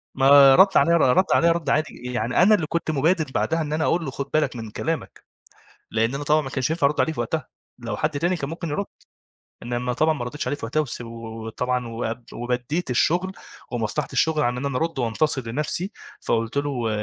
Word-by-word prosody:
ما 135 0 +7
رَد 190 +3 +6
عليّا 170 0 +4
ر - - +1 0.2
رَد 185 - +5
عليّا 170 0 +4
رَد 165 -4 -2
عادي. 155 +2 0 0.2
يعني 120 0 -1
أنا 215 +3 +6
اللي 165 -6 -2
كنت 170 0 -2
مُبادِر 160 +3 +2
بعدها 165 0 +1
إن 150 -1 -3
أنا 155 +1 0
أقول 165 0 +1
له 135 - -4
خُد 140 +1 -5
بالك 155 -4 +1
من 110 -2 -6
كلامك. 160 +6 -4 0.7
لإن 115 +3 0
أنا 140 +1 -4
طبعًا 150 +2 +3
ما 135 -3 -6
كانش 130 +2 -1
ينفع 160 -3 +2
أرُد 150 - 0
عليه 160 - +1
في - - -5
وقتها، 155 -5 -3 0.3
لو 115 -4 -4
حد 155 - 0
تاني 175 +4 +1
كان 140 -3 -4
ممكن 170 +1 -5
يرُد، 175 +7 -2 0.8
إنّما 120 +1 -2
طبعًا 155 +5 +2
ما 120 - -4
ردّيتش 145 +5 -5
عليه 145 - -1
في 140 - -8
وقتها 140 +7 0
وس 140 -6 -4
و 120 - -7 0.4
وطبعًا 125 +2 -2
واب 115 +1 -4
وبدّيت 125 +6 -3
الشغل 175 +9 +1 0.4
ومصلحة 110 -4 -2
الشغل 160 -2 +2
عن 120 -1 0
إن 130 +3 -3
أنا 140 -2 -2
أرُد 165 +1 -2
وأنتصر 130 +4 0
لنفسي، 150 - -2 0.3
فقُلت 115 +2 -1
له 145 0 0
و 120 -4 -2
145 Hz, 220 wpm, -23 LUFS, 125-160 Hz, 0.8 s, ما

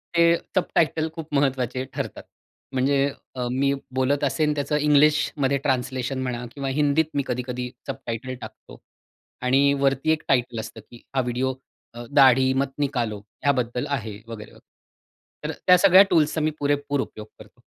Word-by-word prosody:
ते 170 0 +5 0.2
सबटायटल 160 -3 +1
खूप 160 -2 -8
महत्त्वाचे 130 -2 0
ठरतात. - - -5 0.5
म्हणजे 135 +2 +2 0.3
अ, 125 -1 -2
मी 140 +2 +1 0.2
बोलत 140 +2 +1
असेन 150 +2 +1
त्याचं 145 +1 -1
इंग्लिशमध्ये 150 -1 +3
ट्रान्सलेशन 130 0 -1
म्हणा 125 -1 -3
किंवा 140 -1 -4
हिंदीत 145 +3 +2
मी 140 -1 0
कधी-कधी 125 0 -3 0.2
सबटायटल 130 -1 -5
टाकतो - - -11 0.6
आणि 135 +3 +3
वरती 135 +3 +2
एक 155 - 0
टायटल 120 -3 +1
असतं, 110 0 -7
की 120 - -14
हा 130 - +3
व्हिडिओ 125 +2 -1 0.7
दाढी 130 -1 +6
अ, - - -5
मत 135 0 0
निकालो 120 -7 -1 0.2
ह्याबद्दल 125 -2 0
आहे. 110 -7 -3
वगैरे, 110 -2 -9
वगैरे. - - -17 0.8
तर - - -2 0.2
त्या 180 0 +8
सगळ्या 190 +1 +7
टूल्सचा 155 0 +2
मी 155 +1 +1
पुरेपूर 145 -1 0
उपयोग 110 -4 -8
करतो. - - -16
135 Hz, 150 wpm, -24 LUFS, 125-145 Hz, 0.8 s, त्या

